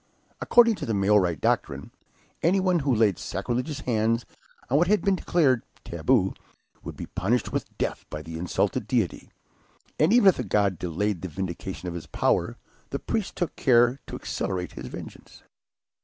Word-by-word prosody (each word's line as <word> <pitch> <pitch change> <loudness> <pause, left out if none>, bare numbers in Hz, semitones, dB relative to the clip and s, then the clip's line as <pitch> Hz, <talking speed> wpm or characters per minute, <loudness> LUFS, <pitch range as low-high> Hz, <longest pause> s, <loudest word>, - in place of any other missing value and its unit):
According 235 -1 +5
to - - -5
the 110 - 0
Maori 100 -3 +3
doctrine, 70 -1 -1 0.5
anyone 185 0 +3
who 135 -4 +1
laid 105 -5 +2
sacrilegious 125 - -3
hands 115 -1 0 0.4
on 140 +4 +3
what 175 - +3
had 210 +2 +2
been 195 -1 +3
declared 145 -9 +2 0.2
"taboo," 95 +4 +1 0.5
would - - -8
be - - -5
punished 120 +6 -1
with - - -4
death - - -2
by 75 0 -6
the 80 +1 -8
insulted 90 0 -1
deity, - - -1 0.7
and 155 +5 +4
even 230 -4 +7
if 185 - +1
the - - -2
god 100 -4 +1
delayed 90 +2 -2
the 95 - -4
vindication 95 +1 -5
of 90 - -3
his 85 -2 -7
power, - - 0 0.3
the - - -2
priests 220 -4 -3
took 175 -4 -2
care 120 +1 +4
to - - -6
accelerate 90 -2 -3
his 65 - -8
vengeance. - - -10
115 Hz, 165 wpm, -26 LUFS, 90-150 Hz, 0.7 s, even